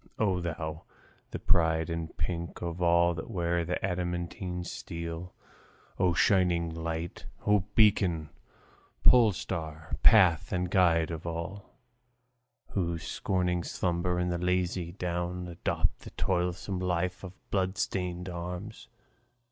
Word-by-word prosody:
O 95 -4 +2
thou, 80 -2 -4 0.4
the - - -4
pride 80 -1 +2
and 85 -2 -4
pink 85 +2 -3
of 85 +1 -4
all 85 0 +4
that 80 - -5
I - - -16
wear 85 -4 0
The 90 +2 -1
adamantine 90 0 -3
steel! 85 0 -6 0.7
O 90 -1 +3
shining 85 -2 +3
light, 80 +1 -4 0.2
O 105 -3 +3
beacon, 95 -8 +4 0.7
polestar, 85 -9 +2
path 90 -8 +6
and 90 -1 -1
guide 85 -4 +4
of 80 +1 -5
all 85 +4 -5 1.0
Who, 85 -3 0
scorning 90 +1 -1
slumber 90 0 -1
and 90 0 0
the 85 - -1
lazy 90 -1 0
down, 90 -1 -3
Adopt 85 -1 -1
the - - -10
toilsome 90 +1 -1
life 90 0 -1
of 95 -1 -7 0.2
bloodstained 95 -2 -1
arms! 90 +4 -6
90 Hz, 120 wpm, -30 LUFS, 85-90 Hz, 1.0 s, path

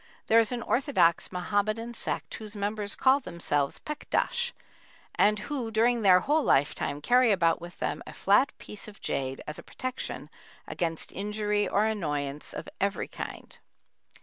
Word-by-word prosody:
There 225 - +6
is 225 0 +2
an 240 -1 -2
orthodox 190 - +2
Mohammedan 215 +5 -1
sect, - - -3
whose 215 -1 -8
members 205 0 -2
call 265 +1 +4
themselves 170 - -1
Pekdash, 480 +10 -1 0.6
and 210 +1 +4
who 245 +2 -3
during 230 +2 +3
their 185 -3 +6
whole 300 - +2
lifetime 145 - +1
carry 245 - +5
about 170 -4 +3
with 175 0 -9
them - - -2
a - - -8
flat 230 +8 +4
piece 210 - -9
of 210 -1 -12
jade 135 -1 -3
as 150 - -6
a - - -10
protection 255 0 -5 0.4
against 165 -3 -3
injury 210 +1 -1
or 205 +2 +2
annoyance 150 -9 -2
of - - -6
every 200 +1 0
kind. - - -8
210 Hz, 150 wpm, -28 LUFS, 175-235 Hz, 0.6 s, There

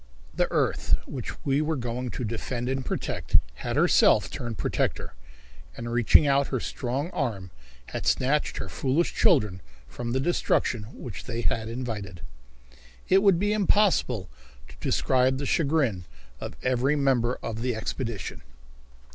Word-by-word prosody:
The - - 0
earth - - +2
which - - -7
we 140 +1 +2
were 155 +1 0
going 125 -1 -3
to 125 - -5
defend 120 +2 -3
and 135 +1 -1
protect - - 0 0.2
had - - -2
herself - - +4
turned 115 -3 -5
protector, 85 - -1 0.6
and 120 0 -5
reaching 120 +5 +5
out 140 0 +3
her 130 - -1
strong 135 +9 -3
arm 95 -7 -3 0.4
had - - -4
snatched 145 +4 +1
her - - -4
foolish 140 +5 0
children 95 -4 +3 0.3
from 120 - -5
the 130 - +1
destruction 130 -7 +1
which 120 -6 -8
they 120 -1 -3
had 110 -1 -1
invited. 110 -7 -5 0.9
It 190 +1 +6
would 195 -4 +5
be 205 +3 +1
impossible 190 - +2 0.4
to - - -13
describe 130 0 +2
the 140 - -3
chagrin 140 - +1 0.3
of - - -6
every 130 +3 +2
member 130 -4 +2
of 115 0 -4
the 125 -1 -1
expedition. 115 0 -4
125 Hz, 145 wpm, -26 LUFS, 115-140 Hz, 0.9 s, It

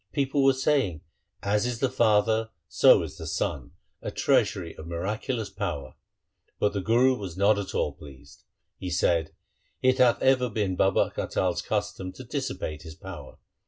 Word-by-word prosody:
People 140 -1 +1
were 135 0 +6
saying, 130 - +1 0.2
' - - -41
As 105 +3 +2
is 120 -2 -2
the 135 - +2
father, 110 -2 +2 0.2
so - - +5
is - - -8
the - - -6
son, 65 -4 -3 0.3
a - - -4
treasury 85 -3 +1
of 80 - -10
miraculous 105 +7 -3
power.' 70 -2 -4 0.6
But 105 - +1
the 100 - -2
Guru 120 +5 +3
was 95 -7 -7
not 100 +1 +4
at 100 - -5
all - - 0
pleased. 70 0 -15 0.4
He 90 - -4
said, 85 -2 +1 0.3
' - - -43
It 130 +1 +3
hath 125 -2 +5
ever 130 -2 +3
been 105 -4 -1
Baba 95 +1 +2
Atal's 90 -2 -1
custom 100 -3 -3
to 130 - -10
dissipate 120 - -4
his 80 -1 -10
power. 95 +2 -10
105 Hz, 170 wpm, -27 LUFS, 85-125 Hz, 0.6 s, were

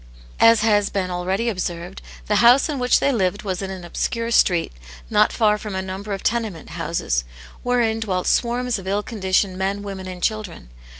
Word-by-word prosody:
As 230 -1 +6
has 205 -2 +3
been 185 -2 -2
already 185 +6 -1
observed, 180 -3 -4 0.2
the 210 - +1
house 245 +4 +6
in 295 -4 -3
wliich 250 0 +4
they 280 - +2
lived 200 -5 0
was 190 -2 -3
in 195 - -4
an 190 -2 -7
obscure 230 +6 -2
street, 175 -6 +3 0.4
not - - +4
far 210 -1 +2
from 210 -2 -6
a 190 - -1
number 190 +2 -6
of 195 -1 -4
tenement 220 -8 -2
houses, - - -1 0.4
wherein 235 -3 +1
dwelt 185 -5 -2
swarms 245 -1 +1
of 190 - -10
ill 200 +2 0
conditioned 190 -3 0
men, 195 +1 -1
women, 195 -2 -6
and 180 -1 -8
children. 210 - -3
200 Hz, 185 wpm, -22 LUFS, 185-230 Hz, 0.4 s, As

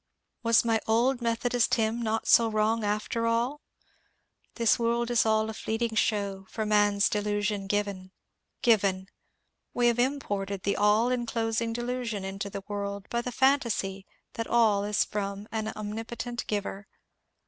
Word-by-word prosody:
Was 230 0 +4
my 225 -1 +2
old 240 +3 +2
Methodist 240 +1 +1
hynm 225 0 0
not 225 -1 -1
so 230 -1 +6
wrong 215 +1 +1
after 215 +2 -1
all? 240 +6 0 0.5
— - - -44
This 230 -1 +3
world 235 +1 0
is 235 -2 +3
all 220 0 +2
a 220 - -4
fleeting 225 +1 -2
show 200 -3 0
For 220 - -3
man's 205 -1 +3
delusion 205 -1 -1
given. 205 -1 0 0.6
^^ - - -48
Given 195 -5 +3
I - - -32 0.3
" - - -52
We 245 - +2
have 235 0 0
imported 205 -8 -1
the 200 - +1
all 210 +4 +3
enclosing 230 -2 -1
delusion 240 -3 -3
into 195 +1 -4
the 195 0 -7
world 200 -1 -4
by 235 - -1
the 250 - -5
phantasy 230 -7 +1 0.3
that 230 - -4
all 220 -4 +3
is 210 0 +2
from 200 0 -4
an 220 -1 -2
omnipotent 225 +3 -5
Giver. 205 -1 -3
220 Hz, 160 wpm, -28 LUFS, 205-235 Hz, 0.6 s, so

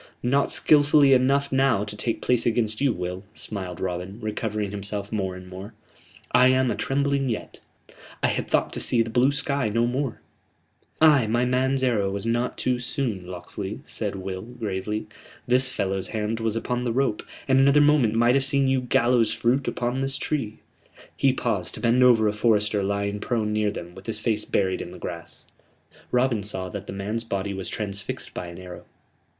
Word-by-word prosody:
"Not 140 +3 +2
skilfully 145 -2 +5
enough 140 +2 +3
now 135 -6 +3
to 105 0 -6
take 115 +2 -2
place 125 -2 +2
against 110 -1 0
you, 140 -2 +3
Will," 90 -1 -4
smiled 95 -5 -5
Robin, 90 +2 -4
recovering 105 -2 -3
himself 100 0 -4
more 95 -4 -2
and 90 0 -10
more. 95 +4 -9 0.6
"I 125 - +6
am 130 0 +3
atrembling 140 +3 0
yet. 110 - -5 0.6
I - - +4
had - - -2
thought - - +1
to - - -4
see 115 -2 +2
the 115 - -7
blue 125 +4 +4
sky 140 -4 -1
no 115 +3 +1
more 130 +1 -2 0.4
" - - -41
"Ay, 130 -6 +2
my 120 +3 +1
man's 130 +1 +1
arrow 110 -6 +2
was 100 +2 -3
not 120 +2 -1
too 125 -1 0
soon, 120 -7 -3
Locksley," 95 +3 -6
said 105 -3 -2
Will, 95 -1 -5
gravely. 110 -2 -4 0.4
"This 125 +1 +3
fellow's 95 -5 -2
hand 110 +1 -2
was 115 -1 -1
upon 125 +2 -2
the 120 - -1
rope, 125 -3 0 0.3
and 135 -1 +4
another 140 +2 +5
moment 145 -7 +4
might 120 +2 +4
have 135 0 +3
seen 140 0 +2
you 130 -1 +2
gallows 120 -2 +2
fruit 125 +5 +1
upon 125 +2 -1
this 135 0 -2
tree." 135 -7 -3 0.6
He 135 - +3
paused 105 -8 -2
to - - -8
bend 120 +1 +3
over 115 -4 +5
a 105 - +1
forester 105 -1 +2
lying 100 +1 -1
prone 110 -2 -1
near 105 -1 +1
them, 85 -4 -7
with 95 +3 -13
his 115 - -2
face 110 -1 -1
buried 95 -2 0
in - - -6
the 90 - -10
grass. 85 -2 -8 0.7
Robin 125 -3 +2
saw 95 -2 -4
that 100 +1 -7
the - - -5
man's 105 +4 -3
body 100 -3 -3
was 95 -2 -5
transfixed 100 -1 -5
by 90 - -5
an 85 0 -9
arrow. 90 -1 -10
115 Hz, 190 wpm, -25 LUFS, 100-130 Hz, 0.7 s, I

